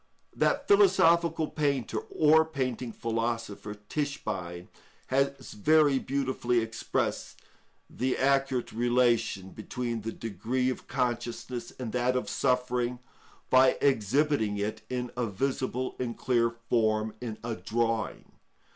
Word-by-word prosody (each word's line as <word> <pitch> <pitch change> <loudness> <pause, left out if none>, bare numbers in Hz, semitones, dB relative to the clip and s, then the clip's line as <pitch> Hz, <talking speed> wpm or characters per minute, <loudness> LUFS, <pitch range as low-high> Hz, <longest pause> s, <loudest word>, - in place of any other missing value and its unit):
_ - - -17
That - - +2
philosophical 170 - +4
painter 140 -5 -1
or 160 +1 +4
painting 130 -6 -3
philosopher, 115 -2 -3
Tischbein, 95 - -3 0.4
has 140 +1 0
very 145 +4 +4
beautifully 130 -3 0
expressed 115 0 -2 0.5
the 130 +1 -1
accurate 135 -2 +1
relation 120 -5 +1
between 120 +1 -4
the 115 +2 -4
degree 120 +5 -2
of - - -8
consciousness 120 -1 -3
and 125 -4 -4
that 125 +1 +1
of 125 - -1
suffering 125 -1 0 0.5
by 130 0 +6
exhibiting 130 -2 +2
it 105 +2 -3
in 125 -1 -3
a 120 -1 -1
visible 130 +3 -2
and 120 -2 -3
clear 120 -2 +2
form 110 -2 0
in 115 -3 -5
a 115 0 -2
drawing. 115 0 -2
125 Hz, 115 wpm, -29 LUFS, 115-135 Hz, 0.5 s, by